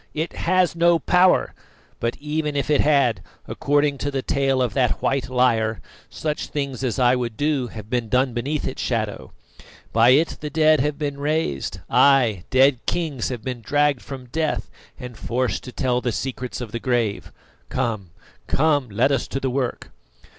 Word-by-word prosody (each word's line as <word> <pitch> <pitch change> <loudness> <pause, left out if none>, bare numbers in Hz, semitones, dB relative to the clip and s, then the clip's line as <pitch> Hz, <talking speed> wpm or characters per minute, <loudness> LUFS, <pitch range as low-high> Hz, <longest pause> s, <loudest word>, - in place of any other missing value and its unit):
It 160 +2 -2
has 180 0 +1
no 170 0 +4
power; 180 +3 +3 0.5
but 115 0 -2
even 150 0 -2
if 140 +1 -1
it 145 - +4
had, 140 -6 +2 0.3
according 145 -1 +1
to 145 - -2
the 135 -2 -3
tale 135 -1 +1
of 125 -3 0
that 125 -4 +1
white 135 -3 -1
liar, 115 -4 +2 0.3
such 150 -1 -3
things 140 -3 -4
as 125 -1 -1
I 125 -1 +4
would 120 -3 -3
do 145 -4 0
have 110 -2 -9
been 120 -1 -2
done 130 +1 +2
beneath 140 +6 -2
its - - -5
shadow. - - -3 0.6
By 115 +2 +5
it 150 +6 +3
the 150 - -4
dead 155 -1 +4
have 145 +2 0
been 145 -2 -3
raised 145 - -2
ay! 120 -10 +4
dead 130 -1 +4
kings 155 -8 -1
have 120 -4 -5
been 125 -2 -4
dragged 145 +2 +1
from 135 -2 -8
death 155 +5 -2 0.3
and 125 -1 -8
forced 125 +3 -2
to 125 - -7
tell 125 -1 0
the 120 - -1
secrets 125 -1 -4
of 115 -3 -6
the 115 - -3
grave. 120 -5 -1 0.4
Come, 115 -8 -2 0.4
come, 145 -3 +2
let 115 +7 +2
us 135 -3 0
to 135 - -3
the 135 -1 -2
work." 130 -2 -3
130 Hz, 175 wpm, -22 LUFS, 120-145 Hz, 0.6 s, By